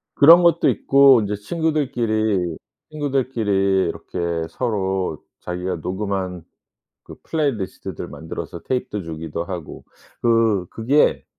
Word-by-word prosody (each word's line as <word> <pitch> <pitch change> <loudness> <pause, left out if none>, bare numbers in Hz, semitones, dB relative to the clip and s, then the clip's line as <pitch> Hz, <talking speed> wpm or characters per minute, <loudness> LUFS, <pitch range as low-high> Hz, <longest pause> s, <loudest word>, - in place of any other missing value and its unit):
그런 165 +5 +8
것도 170 -1 +4
있고 135 -3 +5
인제 105 0 -2
친구들끼리, 110 - -1 0.3
친구들끼리 115 - 0
이렇게 90 - -7 0.3
서로 95 - -2 0.2
자기가 90 0 -3
녹음한 95 0 -3 0.6
그 - - -12
플레이 155 -4 0
리스트들 100 -5 -6
만들어서 80 0 -7
tape도 125 -5 -2
주기도 80 0 -5
하고 85 -3 -7 0.4
그 115 -6 +2
그게 135 +7 +2
105 Hz, 285 characters per minute, -21 LUFS, 90-130 Hz, 0.6 s, 그런